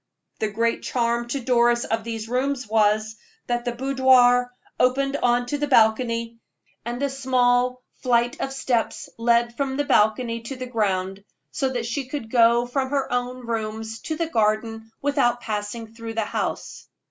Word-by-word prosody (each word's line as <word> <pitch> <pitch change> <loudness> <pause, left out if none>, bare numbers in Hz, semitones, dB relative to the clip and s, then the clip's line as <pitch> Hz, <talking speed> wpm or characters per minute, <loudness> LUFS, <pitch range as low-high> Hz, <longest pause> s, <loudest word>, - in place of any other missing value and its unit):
The 215 - 0
great 230 +2 0
charm 235 -1 -1
to 275 +4 -2
Doris 240 -1 +2
of 225 0 -2
these 225 -1 -5
rooms 255 +1 -1
was, 215 0 +1 0.3
that 240 0 -2
the 240 - 0
boudoir 250 -1 +4 0.3
opened 275 +2 +2
on 245 -1 +2
to 290 +4 -3
a - - +1
balcony, 230 -1 +2 0.4
and 240 +3 -4
a - - +3
small 250 -1 +1 0.2
flight 240 -1 +1
of 270 - -2
steps 250 -4 -2
led 235 0 +2
from 270 0 -2
the 290 - +1
balcony 230 0 +2
to 235 +4 -7
the 255 0 -6
ground, 195 -5 -1 0.3
so 270 -3 -1
that 245 -3 -3
she 250 +3 -3
could 255 -5 -6
go 235 0 +4
from 260 +2 -2
her 275 -2 -1
own 250 0 -3
rooms 225 -1 -4
to 315 - -2
the 335 - -1
gardens 225 -3 -1
without 275 -4 +2
passing 220 0 -5
through 230 -1 -7
the 225 -1 0
house. - - -4
240 Hz, 165 wpm, -23 LUFS, 225-255 Hz, 0.4 s, boudoir